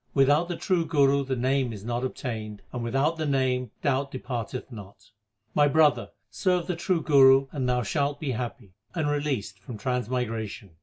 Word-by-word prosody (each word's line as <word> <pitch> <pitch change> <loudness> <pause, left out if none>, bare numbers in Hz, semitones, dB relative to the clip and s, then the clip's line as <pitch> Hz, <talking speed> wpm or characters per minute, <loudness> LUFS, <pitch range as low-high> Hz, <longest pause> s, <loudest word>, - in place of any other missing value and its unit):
Without 145 +4 +4
the 175 - -3
true 180 -2 +1
Guru 140 -3 +3
the 130 -1 -2
Name 130 0 +1
is 105 -2 -8
not 120 +1 -2
obtained, 110 -5 -5
and 120 -2 -3
without 135 +7 +1
the 160 - -2
Name 130 -3 +1
doubt 140 -1 +1
depart 125 -3 -5
eth 130 - -6
not. 100 0 -12 0.4
My 145 -1 +4
brother, 145 -4 +3 0.2
serve 180 - +1
the 180 0 -2
true 170 -1 0
Guru 135 -2 +6
and 130 -4 -2
thou 125 0 +1
shalt 145 +5 -1
be 145 -4 -2
happy, 120 -4 -5 0.2
and 160 -3 0
released 140 -10 -2
from 110 +3 -8
transmigration. 115 -3 -3
130 Hz, 175 wpm, -26 LUFS, 120-145 Hz, 0.4 s, Guru